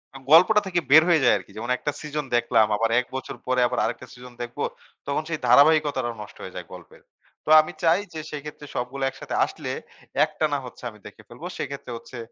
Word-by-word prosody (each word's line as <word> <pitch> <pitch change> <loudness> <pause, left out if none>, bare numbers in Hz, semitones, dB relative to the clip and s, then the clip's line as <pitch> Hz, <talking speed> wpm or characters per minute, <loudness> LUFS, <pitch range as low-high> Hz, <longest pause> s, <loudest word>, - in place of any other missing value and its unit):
Yam 135 - -11
গল্পটা 205 +6 +7
থেকে 175 -2 +1
বের 160 +2 +9
হয়ে 160 -5 +4
যায় - - +5
আরকি। - - -12
যেমন 120 +3 -5
একটা 145 - -2
সিজন 150 -1 -4
দেখলাম 110 -2 +3
আবার 115 +2 +1
১ 125 - -3
বছর 130 - -5
পরে 130 0 +1
আবার - - -2
আরেকটা 120 +2 -4
সিজন 125 -1 -12
দেখবো, 120 0 -4 0.4
তখন 145 +2 -1
সেই 160 - -2
ধারাবাহিকতাটা 145 -4 +4
নষ্ট 105 - -11
হয়ে - - -9
যায় - - -6
গল্পের। - - -13 0.4
তো - - -5
আমি 155 - -7
চাই 165 +3 +4
যে 160 - -5
সেক্ষেত্রে 150 0 -8
সবগুলো 135 +3 -3
একসাথে - - -7
আসলে, - - -6 0.5
একটানা 150 -2 -1
হচ্ছে 125 - -12
আমি 105 -1 -16
দেখে 110 - -12
ফেলব। 120 +8 -14
সেক্ষেত্রে 140 -3 -6
হচ্ছে 125 - -11
140 Hz, 200 wpm, -24 LUFS, 125-155 Hz, 0.5 s, বের